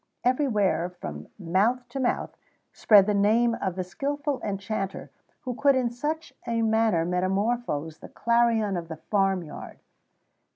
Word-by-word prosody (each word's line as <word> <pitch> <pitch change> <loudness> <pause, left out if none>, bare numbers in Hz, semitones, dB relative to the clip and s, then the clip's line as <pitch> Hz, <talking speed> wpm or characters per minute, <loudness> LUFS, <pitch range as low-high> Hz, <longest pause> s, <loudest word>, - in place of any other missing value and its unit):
Everywhere, 225 - +1
from 75 - -8
mouth 210 +8 +1
to 270 - -5
mouth, 255 - -1 0.4
spread 205 -3 +6
the 210 - +1
name 220 +4 +3
of 190 -3 -2
the 185 - -2
skilful 285 +7 -3
enchanter, 195 -1 -4 0.3
who 255 -3 -4
could 280 +2 +3
in 250 -2 +1
such 300 +6 -4
a 230 -1 0
manner 220 -6 +2
metamorphose 185 -3 -1
the - - -11
clarion 230 -4 +1
of 170 -1 -5
the 160 -1 -7
farm 195 0 0
yard. 150 - -10
215 Hz, 140 wpm, -26 LUFS, 185-240 Hz, 0.4 s, spread